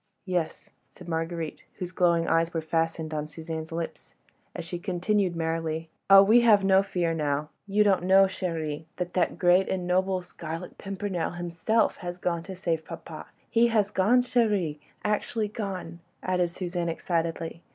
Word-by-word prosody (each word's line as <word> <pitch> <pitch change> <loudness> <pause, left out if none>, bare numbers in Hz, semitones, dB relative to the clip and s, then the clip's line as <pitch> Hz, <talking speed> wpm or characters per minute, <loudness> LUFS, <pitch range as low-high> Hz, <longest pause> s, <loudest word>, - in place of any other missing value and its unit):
"Yes," 180 -4 -2 0.2
said 180 - -14
Marguerite, 165 -1 -3
whose 180 -2 -5
glowing 170 -2 +2
eyes 165 +1 +2
were 165 - +1
fastened 160 0 -1
on 150 0 -2
Suzanne's 160 0 -6
lips, 165 0 -6 0.4
as 175 - -5
she 175 +1 -5
continued 185 0 0
merrily: 160 -1 -2 0.2
"Oh, 195 0 +10
we 225 +4 +6
have 215 -4 +5
no 190 0 +5
fear 180 -4 -1
now! 150 -1 -1 0.2
You 205 +1 +3
don't 195 -3 +2
know, 190 +1 +7
chérie, 165 -5 -2
that 180 -1 -4
that 180 - +1
great 180 0 +4
and 185 -2 -1
noble 185 +1 +1
Scarlet 165 0 -7
Pimpernel 195 -4 -3
himself 175 +6 0
has 175 -1 -6
gone 175 -2 -1
to 190 0 -7
save 165 -3 -1
papa. - - -9 0.2
He 235 0 +4
has 210 -3 +1
gone, 215 +6 +4
chérie... 205 -11 +1 0.3
actually 210 +1 0
gone.. 190 -5 -5
." - - -36
added 180 -1 +1
Suzanne 175 -1 -3
excitedly. 165 0 -2
175 Hz, 160 wpm, -27 LUFS, 165-195 Hz, 0.4 s, Oh